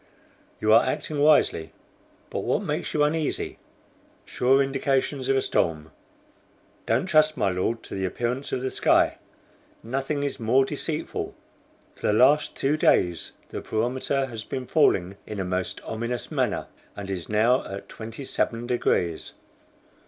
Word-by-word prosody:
"You 110 0 +3
are 115 - +7
acting 145 +3 -2
wisely; 145 - +3 0.6
but - - -2
what - - 0
makes - - -2
you 150 - +2
uneasy?" 155 +1 -1 0.7
"Sure 130 +2 +3
indications 135 0 0
of 135 - +4
a 135 - +1
storm. 80 -2 0 1.0
Don't 115 +9 +2
trust, 155 -4 +4
my 100 - +2
Lord, 95 +6 -1
to - - -9
the 95 -1 -2
appearance 120 +8 -2
of 125 - -1
the 130 0 -2
sky. - - +3 0.6
Nothing 135 +4 -2
is 140 - -3
more 125 +4 +3
deceitful. 150 +2 -4 0.6
For - - -3
the 105 - +3
last 135 +7 +4
two 145 +3 +1
days 85 - +2 0.2
the - - -5
barometer 130 +4 -1
has 115 -4 -7
been 130 +2 -5
falling 100 - +2
in 105 -2 -5
a 95 - -1
most 90 0 -2
ominous 115 +2 -4
manner, - - 0 0.3
and 100 -1 -6
is 90 -3 -5
now 115 +4 +3
at 100 - -7
27 115 +1 -3
degrees. 90 -9 0
125 Hz, 145 wpm, -25 LUFS, 105-140 Hz, 1.0 s, are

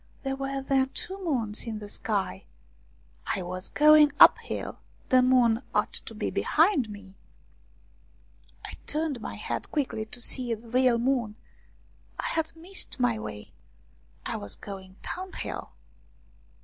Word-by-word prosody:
There 270 -1 -1
were 270 0 -3
then 265 -1 +2
two 385 +1 0
moons 235 - -1
in 220 -1 -3
the 210 -1 -7
sky! 200 - -2 0.9
I 190 - -3
was 185 +1 -5
going 300 0 +7
uphill; - - +5 0.3
the 255 0 +6
moon 250 -2 +4
ought - - +1
to - - -3
be - - -2
behind 315 - +3
me! 200 -2 -11 1.5
I - - -6 0.2
turned 300 -5 -1
my - - -5
head - - -4
quickly 260 -7 -1
to 230 +3 -7
see 245 -1 0
the 225 +2 -15
real 250 0 +3
moon. 235 -3 0 0.8
I - - -2
had 320 0 -1
missed 345 -3 -5
my 240 -3 +2
way 105 - -8 0.7
I - - -2
was 100 - -6
going 190 -2 -9
downhill 370 +1 -5
250 Hz, 135 wpm, -28 LUFS, 215-290 Hz, 1.5 s, going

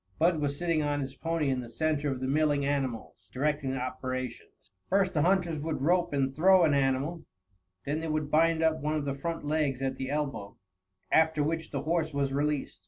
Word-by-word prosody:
Bud 165 0 +3
was 140 -1 -1
sitting 165 -2 +1
on 145 -1 0
his 135 -1 -4
pony 165 -1 -1
in 130 - 0
the 120 -2 -7
center 150 +1 0
of 130 -2 -3
the 130 - -1
milling 145 0 +2
animals, 135 -5 -3
directing 140 +1 -1
the 135 - -2
operations. 130 -2 -5 0.2
First 195 0 +2
the 155 - +2
hunters 175 -2 +2
would 155 -2 -3
rope 175 +2 +2
and 135 -2 0
throw 185 +4 +6
an 155 -3 +4
animal; 140 +4 0 0.6
then 150 +2 -1
they 165 - -4
would 155 -1 -2
bind 165 +1 +3
up 160 -1 +2
one 150 +1 -1
of 150 -2 -2
the 140 - -1
front 165 +3 -4
legs 145 -3 0
at 135 0 -2
the 130 0 -4
elbow, 135 -9 -3 0.5
after 160 -2 +3
which 160 +1 -2
the 140 -1 -3
horse 160 -1 -1
was 140 -1 0
released. 145 -7 -1
150 Hz, 205 wpm, -29 LUFS, 135-160 Hz, 0.6 s, throw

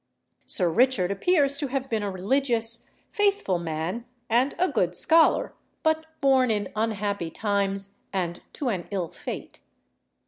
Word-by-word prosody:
Sir 180 - +3
Richard 225 -3 +3
appears 280 - +2
to 285 - -1
have 270 0 -2
been 225 -4 -1
a 205 - -2
religious, 230 +3 0 0.2
faithful 400 - +1
man 170 +8 -4 0.2
and 250 +5 +2
a 365 - +3
good 185 - 0
scholar, 325 - +4 0.3
but 315 0 +1
born 265 -2 +4
in 205 -3 0
unhappy 205 -5 -1
times 200 0 -1
and 175 -2 -2
to 275 -5 -2
an 185 -6 -3
ill 185 -5 -2
fate. - - -7
220 Hz, 140 wpm, -26 LUFS, 190-270 Hz, 0.3 s, scholar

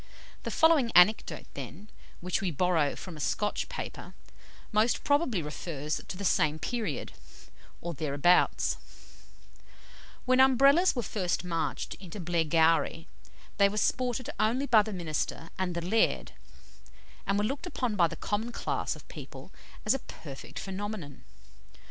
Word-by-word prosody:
The - - -4
following 320 -7 +4
anecdote, 180 +5 +5
then, 140 - -8 0.3
which 180 0 -1
we 195 - 0
borrow 165 -2 +1
from 180 -3 -8
a - - -10
Scotch 210 +7 -1
paper, - - -7 0.6
most 215 +2 +2
probably 285 - +2
refers 150 0 -4
to 185 - -6
the 200 - -4
same 155 -4 +2
period, 215 - -3 0.7
or 170 0 -4
thereabouts: 150 +4 +2 1.5
"When 255 0 +3
Umbrellas 275 +7 +6
were 240 - -1
first 185 -3 -1
marched 165 -4 -2
into 190 +1 -9
Blairgowrie, 165 -1 +2 0.5
they 200 -1 +5
were 210 - -5
sported 250 +2 0
only 245 +6 +2
by 230 -5 +6
the 215 +1 -5
minister 165 -2 -3
and 180 -2 -1
the 170 0 -3
laird, 220 +5 +1 1.0
and 195 - +2
were 205 - +1
looked 275 +9 -3
upon 250 -10 -2
by 175 -4 +4
the - - -7
common 220 +3 -2
class - - -2
of - - -14
people - - -10 0.3
as 215 - +4
a 270 - -1
perfect 140 - -10
phenomenon. 195 -7 -5
190 Hz, 140 wpm, -29 LUFS, 165-230 Hz, 1.5 s, Umbrellas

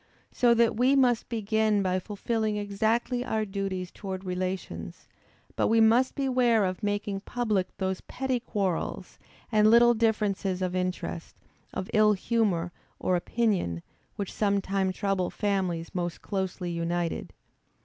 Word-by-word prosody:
So 240 -2 +4
that 235 -1 +3
we 255 +4 +4
must 250 -4 +3
begin 220 -2 +1
by 185 0 +1
fulfilling 215 +2 -2
exactly 220 +4 0
our 220 -3 -1
duties 195 -2 -3
towards 190 -1 -6
relations; 185 +1 -4 0.5
but - - +2
we 225 +1 +4
must 230 +4 +4
beware 250 -6 +2
of 185 +1 -3
making 205 -1 -1
public 210 -3 -2
those 190 -1 -2
petty 260 -1 -2
quarrels, 200 -7 -3 0.3
and 215 -1 +5
little 240 +1 +7
differences 205 -4 0
of 180 0 -2
interest, 180 -2 -3 0.4
of 185 - -4
ill 215 0 +5
humor 195 -5 0 0.3
or 185 - +1
opinion, 180 - 0 0.3
which 200 -2 -4
sometimes 195 -2 0
trouble 195 -3 0
families 185 -5 -1
most 175 -3 -3
closely 190 -2 -3
united. 170 0 -2
205 Hz, 130 wpm, -28 LUFS, 185-225 Hz, 0.5 s, little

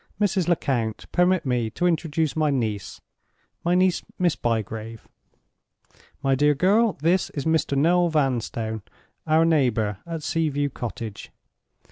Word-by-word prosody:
Mrs. 200 -4 +1
Lecount, 125 -10 -1
permit 180 -2 +2
me 120 -3 0
to 175 - -2
introduce 160 -3 0
my 155 -1 +2
niece—my 120 - -4
niece, 185 0 +3 0.2
Miss 175 -4 +2
Bygrave. 110 -1 -3 1.2
My 135 -1 +2
dear 145 +2 +3
girl, 205 +7 +3
this 175 +3 +2
is 140 - -3
Mr. 160 -3 +1
Noel 175 +4 +3
Vanstone, 120 -7 -1 0.5
our 160 +1 +4
neighbor 115 - +1
at 165 -2 -5
Sea 165 0 0
view 145 0 -1
Cottage. 115 -3 -6
150 Hz, 125 wpm, -24 LUFS, 115-170 Hz, 1.2 s, our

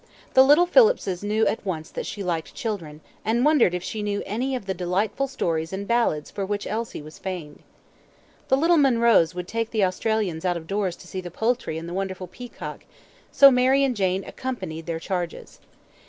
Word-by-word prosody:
The 260 - +8
little 295 +6 +6
Phillipses 395 - +3
knew 215 +2 +1
at - - -1
once 165 -5 -4
that - - -5
she 205 - -5
liked 165 -5 -3
children, 165 -9 -5 0.2
and 235 +4 +1
wondered 285 - +4
if 180 - -4
she 220 - -4
knew 205 -1 -2
any 250 +6 -2
of 245 - -5
the 190 - -1
delightful 190 +9 -1
stories 165 -11 -2
and 195 +1 -5
ballads 230 -11 +1
for 200 - -4
which 205 +1 -3
Elsie 220 -7 -4
was 155 +1 -12
famed. 180 -6 -6 0.9
The 265 - +3
little 335 +4 +4
Munroes 235 - +4
would 180 0 -5
take 230 +1 -2
the 215 -4 +2
Australians 185 -3 -1
out 180 -2 +1
of 165 - -9
doors 195 -1 -1
to - - -15
see 185 - -5
the 180 - -7
poultry 220 -3 -1
and 165 +1 -6
the 175 - -6
wonderful 190 0 -3
peacock, 240 +7 -9 0.5
so 275 -1 +8
Mary 260 +2 +4
and 265 -3 +1
Jane 190 -1 0
accompanied 165 -11 -5
their 165 -1 -2
charges. 175 -1 -5
200 Hz, 195 wpm, -24 LUFS, 175-240 Hz, 0.9 s, The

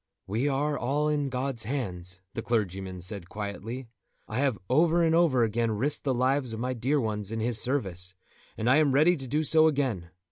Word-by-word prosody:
"We 115 +8 -1
are 145 +1 0
all 145 +4 0
in 145 -2 0
God's 130 -3 -3
hands," 95 -8 -4
the 115 - -3
clergyman 95 -5 -2
said 90 -1 -4
quietly. 105 +5 -5 0.4
"I 110 +3 -3
have 135 -5 +1
over 165 +5 +3
and 160 -1 +3
over 160 -8 +4
again 115 +1 +1
risked 140 +7 0
the 135 - +2
lives 130 0 +1
of 110 - -5
my 125 +2 -1
dear 130 +5 0
ones 105 -4 -2
in 115 - -3
His 110 0 0
service, 95 -9 0 0.4
and 110 - -2
I 130 +3 +6
am 150 -3 +3
ready 155 +6 +5
to 135 -4 -7
do 150 +5 0
so 160 +1 +5
again. 130 - -1
125 Hz, 200 wpm, -28 LUFS, 105-145 Hz, 0.4 s, I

